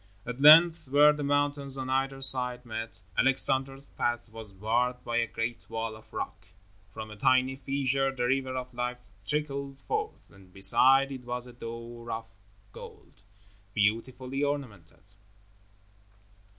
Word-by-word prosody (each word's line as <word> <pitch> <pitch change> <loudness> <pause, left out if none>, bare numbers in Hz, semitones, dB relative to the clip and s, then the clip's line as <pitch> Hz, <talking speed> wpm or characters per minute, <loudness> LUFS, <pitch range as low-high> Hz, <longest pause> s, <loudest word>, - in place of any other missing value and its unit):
At 125 +2 -6
length, 165 +1 +7
where 145 +2 +5
the 150 - -6
mountains 145 -1 0
on 130 -1 -5
either 135 +1 -1
side 125 -2 +5
met, 110 -2 -6
Alexander's 135 +1 +2
path 120 -3 -3
was 110 -2 -11
barred 120 +6 -1
by 120 0 -3
a 115 0 +1
great 115 +1 -5
wall 115 -1 -4
of 110 - -17
rock. - - -7 0.4
From 110 0 -9
a - - -9
tiny 130 +3 +2
fissure 135 0 -1
the 130 -2 -4
River 130 +1 -1
of 125 0 -7
Life 125 0 -5 0.2
trickled 140 -2 -4
forth, 430 0 -5
and 95 -2 -19
beside 130 +8 +5
it 130 -2 -8
was 125 0 -5
a 125 - -13
door 115 0 -9
of 115 0 -5 0.4
gold, - - -14 0.5
beautifully 125 +6 -1
ornamented. 125 - -5
130 Hz, 140 wpm, -28 LUFS, 115-135 Hz, 0.5 s, length